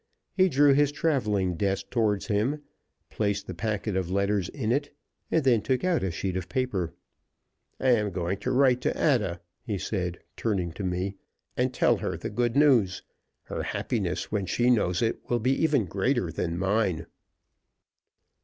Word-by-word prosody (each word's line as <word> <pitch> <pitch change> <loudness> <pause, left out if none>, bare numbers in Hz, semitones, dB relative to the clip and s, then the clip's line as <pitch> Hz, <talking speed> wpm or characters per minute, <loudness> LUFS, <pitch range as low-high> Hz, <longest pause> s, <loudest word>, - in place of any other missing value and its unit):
He 185 -1 +4
drew 145 -1 +5
his 145 +1 +3
traveling 105 - 0
desk 100 0 -1
toward 105 -5 +1
him, 120 +8 0 0.5
placed 100 -2 -1
the 95 - -6
packet 105 +1 -2
of 95 -2 -1
letters 100 -1 0
in 115 -6 -2
it, 145 +3 0 0.4
and 165 - +2
then 120 -5 +4
took 130 - 0
out 180 -3 +2
a 95 - 0
sheet 90 +2 -3
of 95 -2 -4
paper. 120 -10 -1 0.8
"I 130 - +2
am 105 -4 +2
going 90 +1 -2
to 115 - -3
write 130 -1 +4
to - - +1
Ada," 105 - +1 0.2
he 105 -5 -3
said, 90 -2 -3 0.2
turning 95 -7 -1
to 95 +5 -7
me, 95 +2 -2 0.4
"and - - +1
tell - - +3
her - - -3
the - - -5
good 120 +2 0
news. 125 -10 +4 0.4
Her - - -4
happiness, - - -2
when 100 -3 -1
she 120 +7 +2
knows 90 -5 +2
it, 115 - 0
will 120 - +2
be 125 +3 +1
even 145 -9 +3
greater 95 - 0
than 85 0 -2
mine." 95 -3 0
105 Hz, 170 wpm, -27 LUFS, 95-130 Hz, 0.8 s, drew